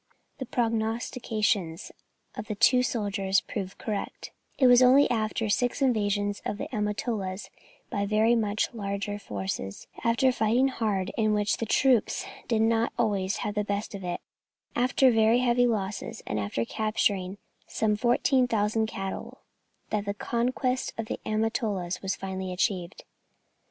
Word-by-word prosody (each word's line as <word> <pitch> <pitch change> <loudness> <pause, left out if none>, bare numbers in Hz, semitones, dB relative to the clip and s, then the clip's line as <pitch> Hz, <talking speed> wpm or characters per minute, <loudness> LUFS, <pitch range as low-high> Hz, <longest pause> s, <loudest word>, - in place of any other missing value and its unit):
The 260 - -5
prognostications 220 -6 -1 0.4
of - - -7
the 215 - -3
two 250 +5 +5
soldiers 200 -5 0
proved 195 -3 -5
correct; 210 -2 -5 0.3
it 265 - +4
was 245 0 +7
only 260 +3 +7
after 220 -1 0
six 245 +6 +1
invasions 205 -6 +1
of 205 - -3
the 280 - -4
Amatolas 210 -2 -2 0.4
by 200 0 -1
very 215 +3 +3
much 220 -1 0
larger 205 -1 -3
forces, 95 - -5 0.2
after 235 +3 +2
hard 255 -1 +4
fighting, 245 +5 +2 0.5
in 215 -1 +3
which 205 0 +1
the 230 - -3
troops 250 -1 +2 0.2
did 220 -2 +2
not 225 0 +2
always 200 -3 0
have 205 - -2
the 210 0 0
best 205 +1 -3
of 195 -1 -7
it, 175 -1 -3 0.5
after 255 +1 +4
very 225 +1 +4
heavy 245 0 +3
losses, 205 -3 -3
and 105 - -2
after 105 +3 -2
capturing 205 - 0 0.3
some 215 -1 +1
14,000 225 -2 +2
cattle, 195 -3 -6 0.5
that 210 -1 -1
the 200 0 -2
conquest 250 +3 -1
of 225 - -2
the - - -4
Amatolas 215 -4 -1
was 190 0 -1
finally 190 -1 -5
achieved. 180 -1 -2
215 Hz, 140 wpm, -27 LUFS, 200-235 Hz, 0.5 s, was